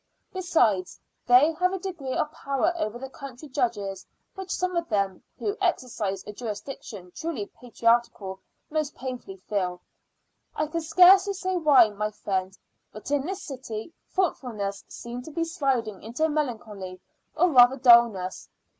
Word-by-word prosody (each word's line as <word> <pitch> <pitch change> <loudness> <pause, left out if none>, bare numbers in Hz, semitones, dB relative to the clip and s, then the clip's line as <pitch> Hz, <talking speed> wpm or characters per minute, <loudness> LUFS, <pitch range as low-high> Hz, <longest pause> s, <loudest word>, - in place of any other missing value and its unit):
Besides, 240 - +1 0.3
they 255 +6 +7
have 365 +1 +2
a - - -1
degree 340 -9 -5
of 300 - 0
power 280 +5 0
over 235 -8 -2
the 265 +2 -6
country 270 +1 -10
judges, 210 -8 -2 0.3
which 385 -1 -8
some 365 0 -1
of 340 -1 -1
them, 195 -4 0 0.2
who 410 -1 -2
exercise 230 - -1
a 210 - -7
jurisdiction 210 -4 -7
truly 320 -11 -4
patriarchal 230 -5 0 0.3
most 305 -2 -1
painfully 250 -7 -6
feel. 185 -2 -2 0.8
I 305 - 0
can 335 +2 -3
scarcely 370 +5 +6
say 375 -1 -2
why, 285 -9 +6
my 210 +1 -2
friend, 190 -2 -3 0.3
but 215 +6 -9
in 290 +1 +1
this 385 +1 -4
city 250 0 -7 0.2
thoughtfulness 225 - -2
seemed 240 +1 -7
to 315 - -8
be 330 +2 -1
sliding 270 - -1
into 245 +9 -1
melancholy 220 -11 -3 0.4
or 345 +2 +3
rather 250 0 +7
dulness. 235 -7 +4
250 Hz, 145 wpm, -26 LUFS, 210-320 Hz, 0.8 s, they